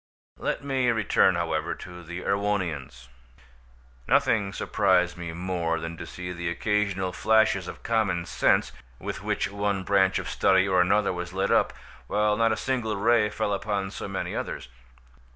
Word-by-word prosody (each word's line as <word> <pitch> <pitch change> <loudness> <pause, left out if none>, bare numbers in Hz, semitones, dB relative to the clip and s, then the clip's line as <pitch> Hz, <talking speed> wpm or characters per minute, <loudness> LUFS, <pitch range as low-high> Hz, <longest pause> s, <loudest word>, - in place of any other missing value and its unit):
Let - - -2
me 135 -3 +1
return, 110 -3 +3
however, - - -1
to 90 -1 -10
the 85 +2 -7
Erewhonians. 90 -12 -2 1.0
Nothing 100 -3 +2
surprised 95 -3 +2
me 85 -1 -6
more 85 -1 -2
than 80 +1 -5
to 85 - -7
see 90 0 -6
the 85 -1 -3
occasional 100 0 0
flashes 110 -3 +3
of - - -9
common 105 -7 0
sense - - +2 0.3
with - - -5
which 100 - -1
one 100 -1 -1
branch 95 0 +3
of - - -4
study 95 0 +3
or 95 -2 +4
another 100 +2 +2
was 90 0 -5
lit 95 0 0
up, - - +3 0.4
while 105 +4 +2
not 115 +1 +3
a 110 - 0
single 120 -6 -1
ray 110 +1 +3
fell 105 0 -1
upon 100 -1 -2
so - - -6
many - - -4
others. 60 - -5
95 Hz, 160 wpm, -26 LUFS, 90-105 Hz, 1.0 s, or